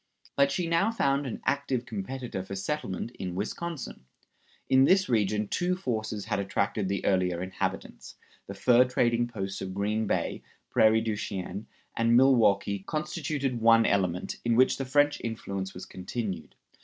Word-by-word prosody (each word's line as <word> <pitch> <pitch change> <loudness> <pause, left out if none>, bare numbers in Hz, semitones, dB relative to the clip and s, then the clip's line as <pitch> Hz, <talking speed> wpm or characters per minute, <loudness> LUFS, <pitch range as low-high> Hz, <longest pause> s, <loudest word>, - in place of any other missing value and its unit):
But 140 0 +3
she 175 +5 -1
now 170 +6 +2
found 140 -10 +1
an 120 - -5
active 135 -4 0
competitor 115 0 -5
for 95 +1 -7
settlement 100 -1 -3
in 90 -2 -4
Wisconsin. 130 - -5 0.6
In 130 0 +5
this 190 +4 +4
region 105 -3 +1
two 180 - 0
forces 110 - -3
had - - -1
attracted 100 0 -1
the 100 - -2
earlier 90 -2 +1
inhabitants. 95 +1 -4 0.3
The 100 - -7
fur 125 +4 +5
trading 120 -1 +1
posts 95 -5 -5
of 95 -1 -5
Green 105 +2 0
Bay, - - -1 0.3
Prairie 110 0 +5
du 110 -1 -1
Chien, 100 0 -5 0.3
and 115 +1 +4
Milwaukee 105 -6 +4
constituted 140 0 -3
one 115 0 +6
element, 90 -3 0
in 120 -1 +2
which 130 +2 +4
the 135 - -3
French 145 +2 +2
influence 100 -4 -4
was 90 - -7
continued. 95 - -5
110 Hz, 155 wpm, -28 LUFS, 100-135 Hz, 0.6 s, one